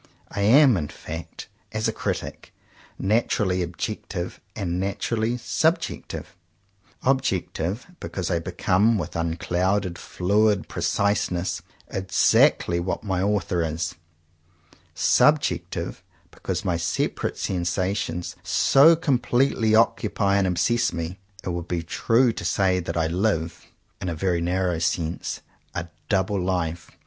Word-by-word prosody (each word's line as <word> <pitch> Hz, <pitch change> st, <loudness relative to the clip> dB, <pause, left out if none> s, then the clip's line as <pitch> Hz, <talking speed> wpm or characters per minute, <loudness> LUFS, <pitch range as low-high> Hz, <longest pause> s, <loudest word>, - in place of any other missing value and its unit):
I 100 Hz, -, -3 dB
am, 125 Hz, +3 st, +6 dB
in 75 Hz, -4 st, -2 dB
fact, 80 Hz, +2 st, -8 dB, 0.2 s
as 110 Hz, +1 st, -1 dB
a 110 Hz, -, -1 dB
critic, -, -, -4 dB, 0.5 s
naturally 100 Hz, -3 st, +1 dB
objective 90 Hz, 0 st, -4 dB
and 90 Hz, -4 st, -2 dB
naturally 110 Hz, +4 st, -1 dB
subjective: 160 Hz, +7 st, -1 dB, 0.7 s
objective, 110 Hz, -6 st, 0 dB
because 95 Hz, -1 st, -4 dB
I 85 Hz, -, +2 dB
become 100 Hz, +6 st, +2 dB
with 95 Hz, -, -4 dB
unclouded, 90 Hz, +3 st, 0 dB
fluid 105 Hz, +2 st, +1 dB
preciseness, 100 Hz, -3 st, 0 dB, 0.3 s
exactly 95 Hz, -2 st, +3 dB
what 90 Hz, +2 st, -3 dB
my 95 Hz, -3 st, -1 dB
author 100 Hz, -3 st, +1 dB
is: 80 Hz, +2 st, -2 dB, 1.0 s
subjective, -, -, +2 dB, 0.3 s
because -, -, -4 dB
my 85 Hz, -2 st, +1 dB
separate 80 Hz, -1 st, -1 dB
sensations 90 Hz, -1 st, -2 dB
so 150 Hz, +5 st, +5 dB
completely 125 Hz, -6 st, +2 dB
oc 115 Hz, +1 st, +4 dB
cupy 100 Hz, -2 st, +1 dB
and 100 Hz, -1 st, +2 dB
obsess 115 Hz, +7 st, +1 dB
me. 85 Hz, +3 st, -5 dB, 0.2 s
It -, -, -3 dB
would 85 Hz, -1 st, -3 dB
be 85 Hz, -2 st, -2 dB
true 115 Hz, +8 st, +2 dB
to -, -, -6 dB
say 95 Hz, -2 st, +2 dB
that 85 Hz, -, -4 dB
I 80 Hz, -, +2 dB
live, 85 Hz, -1 st, -1 dB, 0.3 s
in 90 Hz, -, -2 dB
a 85 Hz, -, -3 dB
very 85 Hz, +1 st, 0 dB
narrow 90 Hz, -1 st, 0 dB
sense, 85 Hz, 0 st, -2 dB, 0.3 s
a 85 Hz, 0 st, -4 dB, 0.2 s
double 95 Hz, -1 st, +1 dB
life. 85 Hz, -3 st, -2 dB
95 Hz, 120 wpm, -24 LUFS, 85-110 Hz, 1.0 s, am